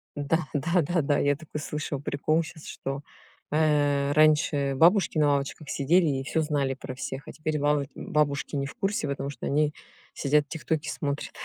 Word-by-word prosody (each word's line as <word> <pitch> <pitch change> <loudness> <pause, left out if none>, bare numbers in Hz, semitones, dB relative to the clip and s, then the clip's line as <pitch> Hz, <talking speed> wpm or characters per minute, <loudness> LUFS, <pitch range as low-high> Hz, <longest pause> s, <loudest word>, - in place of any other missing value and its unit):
Да, 150 +2 0
да-да-да, 160 -1 +1
я 145 0 +2
такой 155 0 -7
слышала 150 -1 -3
прикол 155 +3 0
щас 160 -1 -11
что, 135 +1 -5 0.5
э, 145 -2 +2
раньше 150 -2 +3
бабушки 170 +3 +4
на 150 - +4
лавочках 140 +1 -2
сидели 165 +5 +3
и 135 -2 0
всё 160 +3 0
знали 145 -3 0
про 130 -1 -8
всех, 135 +1 -6
а - - -6
теперь 155 -1 -2
балу 145 0 +2
бабушки 145 -1 -1
не 140 -1 0
в 140 - -7
курсе, 195 -5 -1
потому 140 0 -3
что 140 -4 -7
они 150 +1 +2 0.4
сидят 145 +1 +2
тиктоки 155 -1 -2
смотрят. 145 -1 -3
150 Hz, 170 wpm, -27 LUFS, 140-155 Hz, 0.5 s, бабушки